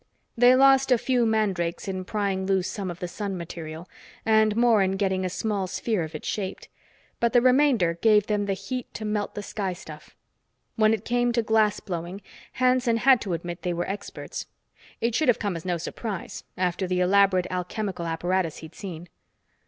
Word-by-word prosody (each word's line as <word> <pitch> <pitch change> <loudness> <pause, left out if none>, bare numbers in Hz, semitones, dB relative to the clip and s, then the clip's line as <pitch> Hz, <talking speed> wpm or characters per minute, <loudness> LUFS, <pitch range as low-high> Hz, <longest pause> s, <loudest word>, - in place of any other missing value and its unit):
They 245 +1 +6
lost 270 0 +5
a 250 - +6
few 245 -1 +1
mandrakes 195 -6 0
in 185 -1 -3
prying 195 -2 -1
loose 190 -2 +1
some 195 -3 -4
of 175 - -6
the 180 - -3
sun 195 +1 -4
material, 165 0 -7 0.4
and 220 -1 +4
more 230 -2 +4
in 190 0 +1
getting 190 -2 0
a 185 - -1
small 200 +1 -2
sphere 210 +1 -1
of 160 0 -5
it 155 - -7
shaped. 195 -3 -4 0.5
But 235 0 +1
the 245 - +6
remainder 255 -9 +4
gave 210 -2 +5
them 205 -1 -1
the 195 - 0
heat 225 +6 -5
to 215 - -5
melt 210 -1 -2
the 205 - -4
sky 195 -2 -3
stuff. 155 -4 -12 0.6
When 215 -1 +4
it 220 -1 -1
came 245 0 +1
to 235 -1 +1
glass 215 -1 +2
blowing, 175 +1 -5 0.3
Hanson 250 -2 +2
had 260 +1 +5
to 195 -5 -3
admit 170 +1 -5
they 180 -2 -1
were 175 +1 -2
experts; 200 +1 -6 0.5
it 230 +1 +1
should 310 +7 +1
have 245 - +4
come 200 -4 -2
as 165 - -7
no 175 -2 0
surprise, 195 +4 -6
after 185 +1 -1
the 180 0 0
elaborate 185 0 +4
alchemical 180 0 -3
apparatus 170 0 -1
he'd 160 0 -11
seen. 175 -4 -8
200 Hz, 190 wpm, -25 LUFS, 180-225 Hz, 0.6 s, They